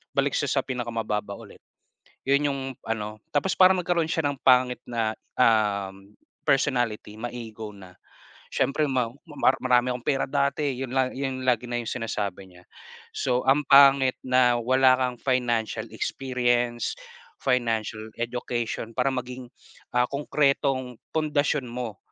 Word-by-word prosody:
balik - - +1
siya - - 0
sa - - +2
pinakamababa 115 -5 -3
ulit. - - -14 0.7
'Yon 140 +2 +3
'yong 140 -1 -3 0.3
ano 110 -1 -3 0.2
tapos 185 +6 +2
parang 185 0 +7
nagkaroon 170 -2 0
siya 160 - 0
ng 140 -2 -4
pangit 125 -1 +4
na, 115 -2 -1 0.3
um, 100 -4 +1 0.3
personality, 120 -6 +1
ma-ego 115 -2 -6
na. 95 -2 -14 0.6
Siyempre, 150 +3 +1
"Ma 125 -3 0 0.2
mar 145 -4 +1
marami 125 0 +3
akong 125 -1 -7
pera 135 -2 +1
dati", 140 0 0
'yon 130 -1 -4
la 130 -1 +2
'yon 130 -1 -4
lagi 125 -1 +2
na 120 0 -1
'yong 115 - -6
sinasabi 100 -4 -4
niya. 90 0 -18 0.5
So, 125 0 +1
ang 145 +2 +4
pangit 135 -2 +7
na, 125 -1 +4
wala 130 +2 +4
kang 125 -1 -1
financial 120 -3 0
experience, 120 0 -1 0.5
financial 110 -3 -1
education. 120 -1 -3
Para 125 +1 +2
maging 125 0 -6 0.5
ah, 125 - +5
konkretong 140 -3 0 0.2
pundasyon 150 -2 +1
mo, 120 -4 -5
125 Hz, 135 wpm, -26 LUFS, 115-135 Hz, 0.7 s, parang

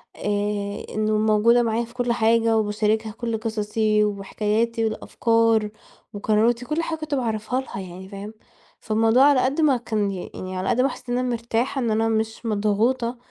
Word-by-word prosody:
آآ، 205 0 -2
إنه 215 0 0
موجودة 220 +3 +4
معايا 230 +1 0
في 235 - -17
كل 245 -1 0
حاجة 230 0 +3
وباشاركها 215 +1 0
كل 230 +1 -3
قصصي 215 -1 0
وحكاياتي 210 +3 -1
والأفكار 225 0 +1 0.4
وقراراتي 220 +4 +1
وكل 305 +5 -1
حاجة 325 -1 -3
كنت 310 -2 -3
باعرّفها 235 0 -1
لها 260 - -8
يعني 185 0 -9
فاهم؟ 200 +2 -8 0.5
فالموضوع 225 +3 +3
على 285 -2 +5
قد 275 +5 0
ما 285 -4 +4
كان 215 -4 -1
يعني 185 0 -6
على 185 - -2
قد 250 - +2
ما 270 - +2
حاسة - - -9
إن - - +1
أنا 255 0 -1
مرتاحة 235 +3 -1
إن 235 -2 0
أنا 225 +1 +1
مش 220 +1 -2
مضغوطة 225 +4 0
225 Hz, 165 wpm, -23 LUFS, 210-240 Hz, 0.5 s, على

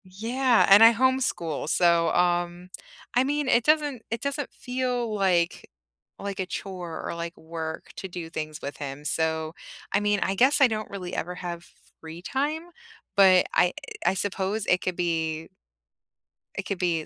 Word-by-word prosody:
Yeah, 230 +6 +2
and 200 +3 +9
I 230 +1 +9
homeschool, 240 - 0
so, 170 -1 +4
um, 175 0 0 0.4
I 245 - +4
mean, 290 +1 -1
it 240 -2 +4
doesn't 295 -4 +2
it 230 0 -3
doesn't 280 +1 -3
feel 250 -3 -2
like 180 -4 +1 0.5
like 200 -1 -5
a 190 - 0
chore 180 -3 -6
or - - -3
like 170 0 -5
work 160 -1 -6
to 190 - -5
do 175 -3 -7
things 155 -1 -5
with 140 - -5
him, 140 +1 -7
so, 160 0 -1 0.4
I 200 - +4
mean, 205 0 +1
I 190 - 0
guess 260 +9 +4
I 275 - +7
don't 215 -2 -4
really 185 -3 -6
ever 180 +2 -3
have 175 -1 -6 0.3
free 160 +1 -9
time? 300 - -2 0.5
But 190 -2 +6
I 180 0 +3 0.3
I - - +3
suppose 200 +2 -1
it 180 -2 +2
could 185 - -2
be 160 -2 -2 1.1
it - - -2
could 195 - -3
be 170 -4 0
185 Hz, 165 wpm, -26 LUFS, 170-235 Hz, 1.1 s, and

